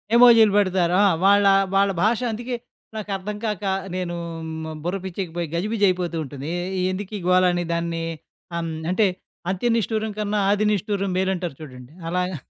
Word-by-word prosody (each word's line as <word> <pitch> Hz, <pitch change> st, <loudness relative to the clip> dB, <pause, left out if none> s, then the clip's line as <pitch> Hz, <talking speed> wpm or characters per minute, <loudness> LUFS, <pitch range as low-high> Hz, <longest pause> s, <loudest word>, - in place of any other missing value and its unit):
ఎమోజీలు 235 Hz, -3 st, +8 dB
పెడతారు. 185 Hz, -3 st, +2 dB
ఆ! -, -, +6 dB, 0.2 s
వాళ్ళ 200 Hz, +1 st, +5 dB, 0.3 s
వాళ్ళ 195 Hz, 0 st, +4 dB
భాష 220 Hz, +2 st, +3 dB
అందుకే 240 Hz, +3 st, -4 dB, 0.4 s
నాకు 215 Hz, -1 st, -5 dB
అర్థం 205 Hz, +2 st, -5 dB
కాక, 210 Hz, -3 st, -2 dB, 0.3 s
నేను 180 Hz, -2 st, -3 dB, 0.3 s
హ్మ్. 160 Hz, 0 st, -5 dB
బుర్ర 180 Hz, +3 st, -1 dB
పిచ్చేకి 185 Hz, -2 st, -4 dB
పోయి, 170 Hz, -2 st, -2 dB
గజిబిజయిపోతూ 185 Hz, -3 st, +1 dB
ఉంటుంది. 140 Hz, +2 st, -7 dB, 0.3 s
ఎ -, -, 0 dB
ఎందుకు 195 Hz, +2 st, -5 dB
ఈ -, -, -6 dB
గోల 185 Hz, 0 st, +5 dB
అని 175 Hz, 0 st, -1 dB
దాన్ని 170 Hz, 0 st, -2 dB, 0.5 s
ఆహ్, 170 Hz, -, -1 dB
హ్మ్. 165 Hz, -, -3 dB, 0.2 s
అంటే 205 Hz, +3 st, +3 dB, 0.4 s
'అంత్య 190 Hz, +6 st, 0 dB
నిష్టురం 220 Hz, -1 st, -1 dB
కన్నా, 210 Hz, 0 st, -1 dB
ఆది 210 Hz, +1 st, +2 dB
నిష్ఠురం' 200 Hz, -1 st, -1 dB
మేలంటారు 185 Hz, -5 st, -1 dB
చూడండి, 130 Hz, -2 st, -11 dB, 0.2 s
అలాగా 180 Hz, +1 st, -1 dB
190 Hz, 165 wpm, -23 LUFS, 170-210 Hz, 0.5 s, ఎమోజీలు